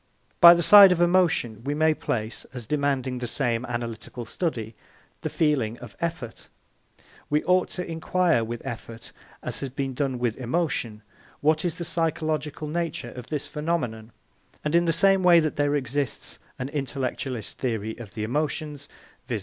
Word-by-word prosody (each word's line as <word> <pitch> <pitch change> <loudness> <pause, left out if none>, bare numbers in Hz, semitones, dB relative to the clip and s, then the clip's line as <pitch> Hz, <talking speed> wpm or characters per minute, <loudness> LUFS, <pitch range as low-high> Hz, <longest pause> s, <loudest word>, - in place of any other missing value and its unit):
By 170 0 +10
the 170 - +1
side 200 0 +10
of 180 - +1
emotion 175 - +2
we 145 +2 -2
may 155 +1 +3
place, 110 -6 -3
as 120 -2 -5
demanding 135 -2 -1
the 120 - -3
same 120 -2 +1
analytical 120 0 -5
study, 115 - -3 0.5
the - - -2
feeling 130 -8 0
of 120 -4 -11
effort. 160 -9 -5 0.8
We 150 +1 +1
ought 180 0 +2
to 180 - -2
inquire 165 -4 +1
with 115 +1 -6
effort, 115 0 -7 0.3
as - - -3
has 135 - -4
been 135 0 -3
done 130 -1 -1
with 120 -2 -1
emotion, 125 -5 -2 0.4
what 155 +1 +2
is 175 -3 -1
the 170 - -5
psychological 155 -2 -2
nature 155 -6 -3
of 125 -1 -9
this 150 -3 -3
phenomenon; 125 -8 -3 0.5
and 150 - -1
in 170 0 +4
the 165 - +3
same 195 +3 +4
way 175 -2 +7
that 155 -2 -1
there 145 0 +2
exists 135 -2 -3 0.2
an 130 +1 -4
intellectualist 135 -4 -4
theory 110 -3 -2
of 105 -5 -10
the 110 - -3
emotions, 145 +3 -3 0.4
viz. 115 -4 -2
145 Hz, 165 wpm, -25 LUFS, 120-165 Hz, 0.8 s, By